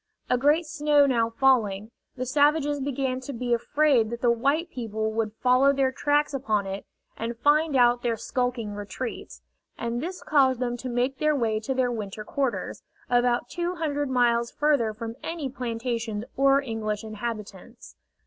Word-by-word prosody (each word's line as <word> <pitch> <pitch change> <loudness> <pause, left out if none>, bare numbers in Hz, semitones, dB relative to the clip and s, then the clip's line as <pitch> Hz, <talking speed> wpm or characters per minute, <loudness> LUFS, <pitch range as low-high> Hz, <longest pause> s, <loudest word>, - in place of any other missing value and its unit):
A 250 - +4
great 300 +5 +3
snow 295 -2 +3
now 235 -4 +2
falling, 225 -4 +2 0.2
the 255 0 -3
savages 290 +2 +2
began 265 -1 -1
to 260 +2 -7
be 240 0 -1
afraid 260 -1 +2
that 235 0 -6
the 240 - +4
white 280 +9 0
people 220 -3 -3
would 220 -1 -1
follow 255 +2 +5
their 270 -1 +1
tracks 290 +2 +1
upon 215 -7 0
it 195 +1 -6 0.3
and 230 +1 -4
find 295 +3 +3
out 245 -1 +4
their 235 -2 -1
skulking 245 -3 -2
retreats, 205 +4 -6 0.3
and 235 +1 -3
this 360 +4 -6
caused 265 -4 +3
them 245 -1 -1
to 255 +1 -6
make 250 +2 -1
their 305 0 +2
way 225 -5 0
to 260 +5 -3
their 255 -1 +1
winter 215 -2 -5
quarters, 270 +3 -2 0.3
about 245 0 +2
two 350 +4 -3
hundred 290 -4 -2
miles 235 -2 +2
further 285 -7 +1
from 225 +2 -7
any 325 -5 -4
plantations 230 -3 -3
or 275 +1 +4
English 220 -4 -3
inhabitants. 215 +1 -7
250 Hz, 165 wpm, -26 LUFS, 230-280 Hz, 0.3 s, follow